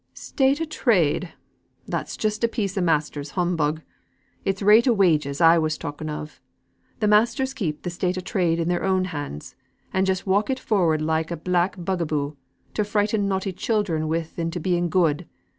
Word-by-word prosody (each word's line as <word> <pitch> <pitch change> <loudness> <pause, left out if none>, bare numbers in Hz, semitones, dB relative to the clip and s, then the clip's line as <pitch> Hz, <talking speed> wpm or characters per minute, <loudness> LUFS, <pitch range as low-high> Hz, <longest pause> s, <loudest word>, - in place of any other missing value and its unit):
"State 270 +2 +1
o' 325 - -1
trade! 185 - +1 0.5
That's - - -4
just 215 +1 -1
a - - +5
piece 205 -5 -3
o' 195 - 0
masters' 150 -3 0
humbug. 160 -3 0 0.6
It's 195 +1 -1
rate 215 +5 +6
o' 245 - +5
wages 155 -9 +2
I 165 0 +6
was 155 -1 0
talking 145 +2 -6
of. 150 0 -7 0.6
Th' 215 - +1
masters 235 +6 +3
keep 160 - -3
th' 175 - -3
state 180 +1 -1
o' - - -2
trade 175 -2 0
in 165 - 0
their 175 0 0
own 190 -1 +2
hands; 145 - -6 0.4
and 190 0 +2
just 185 -1 0
walk 200 +4 +1
it 265 - 0
forward 170 -10 +1
like 160 0 0
a 170 - -3
black 180 +3 0
bug 180 0 -2
a 165 - -1
boo, 145 -1 -2 0.4
to 210 - 0
frighten 205 0 0
naughty 190 0 -1
children 180 -6 -1
with 165 +1 -3
into 165 +1 -2
being 175 0 0
good. 165 -1 +1
180 Hz, 185 wpm, -24 LUFS, 160-205 Hz, 0.6 s, rate